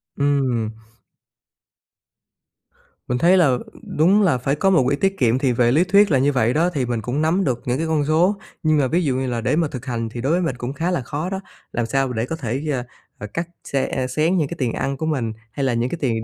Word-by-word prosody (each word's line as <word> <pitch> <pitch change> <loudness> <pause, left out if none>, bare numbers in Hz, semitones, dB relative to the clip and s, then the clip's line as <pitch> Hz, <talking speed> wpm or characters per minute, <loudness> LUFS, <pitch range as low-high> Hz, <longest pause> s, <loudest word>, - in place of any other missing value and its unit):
Ừm. 135 -6 +1 2.4
Mình 125 - 0
thấy 175 +7 +5
là 140 -8 +4 0.4
đúng 185 +7 +5
là 180 -10 +3
phải 135 +4 -1
có 195 +6 +2
một 170 -8 +4
quỹ 140 - +2
tiết 195 +6 0
kiệm, 120 -1 +3
thì 135 -2 +2
về 120 0 +3
lý 155 +7 +4
thuyết 200 +2 +4
là 135 - +4
như 140 +2 +3
vậy 120 -3 +1
đó, 165 +4 +2
thì 135 -5 0
mình 120 -2 -2
cũng 125 +7 -2
nắm 165 +5 +2
được 125 -4 -1
những 125 +1 0
cái 160 +2 -2
con 155 -3 +1
số. 170 +6 +3 0.3
Nhưng 155 -1 +3
mà 140 -3 +2
ví 170 +6 +1
dụ 135 -4 0
như 130 0 -1
là 120 -2 -2
để 125 +7 +1
mà 165 -2 +2
thực 135 -3 -8
hành 115 -3 -3
thì 120 +1 -6
đối 135 +5 0
với 180 +2 +2
mình 135 -7 -1
cũng 125 +2 -5
khá 165 +5 -1
là 175 - 0
khó 150 +8 -4
đó. 190 - -3 0.3
Làm 120 - -1
sao 135 +2 0
để 110 0 -1
có 160 - -4
thể, 135 -2 -3
ơ, 130 -3 -1 0.3
ờ, 100 - -7
cắt 170 0 -2 0.2
xe 135 -1 -1
ơ, 130 -1 -1
xén 155 +8 +1
những 155 -4 +1
cái 170 - -6
tiền 125 -4 0
ăn 135 0 -2
của 160 - -3
mình 125 -8 -1 0.2
hay 140 - -3
là 130 -2 +1
những 120 +1 0
cái 175 - -4
tiền 115 -5 0
135 Hz, 260 wpm, -21 LUFS, 125-160 Hz, 2.4 s, thấy